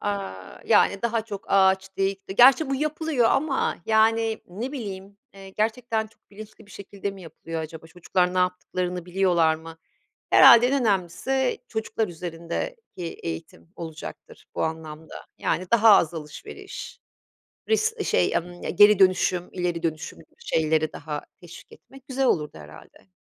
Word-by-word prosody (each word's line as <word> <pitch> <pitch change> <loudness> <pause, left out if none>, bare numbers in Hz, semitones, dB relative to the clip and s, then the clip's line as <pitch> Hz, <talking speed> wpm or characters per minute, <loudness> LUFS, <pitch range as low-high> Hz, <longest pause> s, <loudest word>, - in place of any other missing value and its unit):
aaa, 145 - -5
yani, 210 -2 +3
daha 230 -1 0
çok 200 -3 -7
ağaç 190 0 +2
dik 195 0 -2
di 190 - -5
gerçi 265 +5 +6
bu 275 - +1
yapılıyor 305 -3 0
ama, 280 -2 0
yani, 225 0 +2
ne 225 +10 -6
bileyim, 200 -6 -7 0.2
eee, 195 -1 -12
gerçekten 220 +2 -1
çok 215 - -28
bilinçli 215 +1 -13
bir - - -19
şekilde 200 0 -6
mi 195 -1 -12
yapılıyor 165 0 -7
acaba, 160 +1 -8
çocuklar 180 +2 -1
ne - - +1
yaptıklarını 180 -1 -2
biliyorlar 175 -3 +2
mı? 160 +1 -11 0.5
Herhâlde 235 +1 +8
en 275 +2 +1
önemlisi 225 +6 0
çocuklar 220 -1 -2
üzerindeki 175 - -6 0.2
eğitim 80 0 -7
olacaktır 160 -1 -9
bu - - -2
anlamda, 160 0 -6 0.2
yani, 185 - -1
daha 225 -1 +6
az 170 -2 +1
alışveriş, 150 -2 -9 0.7
ris 445 0 +1
şey, - - +1
ımm, 175 +1 -5
geri 205 0 +7
dönüşüm, 185 -1 +2
ileri 175 -2 -2
dönüşüm 160 -2 -4
gibi - - -20
şeyleri 160 - 0
daha 150 0 -6 0.2
teşvik 175 -1 -14
etmek 270 0 -17
güzel 265 0 0
olurdu 150 - 0
herhâlde. 75 +5 -15
190 Hz, 145 wpm, -24 LUFS, 165-225 Hz, 0.7 s, Herhâlde